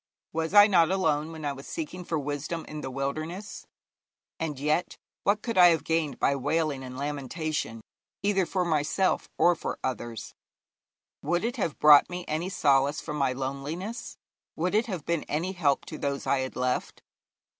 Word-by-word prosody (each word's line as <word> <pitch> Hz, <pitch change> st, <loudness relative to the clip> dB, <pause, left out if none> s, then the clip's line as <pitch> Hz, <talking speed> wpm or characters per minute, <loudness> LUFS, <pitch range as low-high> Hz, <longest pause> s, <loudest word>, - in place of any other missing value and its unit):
Was 160 Hz, +4 st, -2 dB
I 205 Hz, 0 st, +10 dB
not 175 Hz, -6 st, +4 dB
alone 160 Hz, -5 st, +1 dB
when 160 Hz, -2 st, -7 dB
I 145 Hz, -, -1 dB
was 135 Hz, 0 st, -10 dB
seeking 295 Hz, -, -5 dB
for 165 Hz, -2 st, -2 dB
wisdom 150 Hz, +3 st, -3 dB
in 150 Hz, 0 st, -7 dB
the 135 Hz, -, -4 dB
wilderness? 155 Hz, -, -4 dB, 0.7 s
And 150 Hz, -4 st, -3 dB
yet 150 Hz, +5 st, 0 dB, 0.3 s
what 205 Hz, +1 st, +2 dB
could 230 Hz, -5 st, 0 dB
I 180 Hz, -, +10 dB
have 165 Hz, -2 st, +3 dB
gained 160 Hz, -4 st, 0 dB
by 140 Hz, -, +2 dB
wailing 145 Hz, 0 st, 0 dB
and 130 Hz, 0 st, -8 dB
lamentation 145 Hz, -3 st, -3 dB, 0.4 s
either 195 Hz, -3 st, +2 dB
for 185 Hz, -2 st, 0 dB
myself 160 Hz, +4 st, +1 dB
or 175 Hz, -, +5 dB
for 165 Hz, -, -4 dB
others? 120 Hz, -2 st, -4 dB, 0.9 s
Would 175 Hz, +4 st, 0 dB
it 240 Hz, -, -2 dB
have 160 Hz, -, -2 dB
brought 150 Hz, -1 st, +8 dB
to -, -, -18 dB
me 180 Hz, 0 st, -5 dB
any 160 Hz, +4 st, -2 dB
solace 140 Hz, -5 st, +2 dB
from 150 Hz, -1 st, -5 dB
my 135 Hz, -2 st, +2 dB
loneliness? 140 Hz, -, -5 dB, 0.4 s
Would 180 Hz, +4 st, -1 dB
it 220 Hz, +3 st, +2 dB
have 185 Hz, -8 st, -5 dB
been 170 Hz, -2 st, 0 dB
any 165 Hz, +5 st, -2 dB
help 155 Hz, -7 st, +1 dB
to 155 Hz, -, -8 dB
those 140 Hz, -1 st, -2 dB
I 140 Hz, -, +2 dB
had 130 Hz, 0 st, -4 dB
left?' 125 Hz, 0 st, -2 dB
155 Hz, 175 wpm, -28 LUFS, 140-180 Hz, 0.9 s, I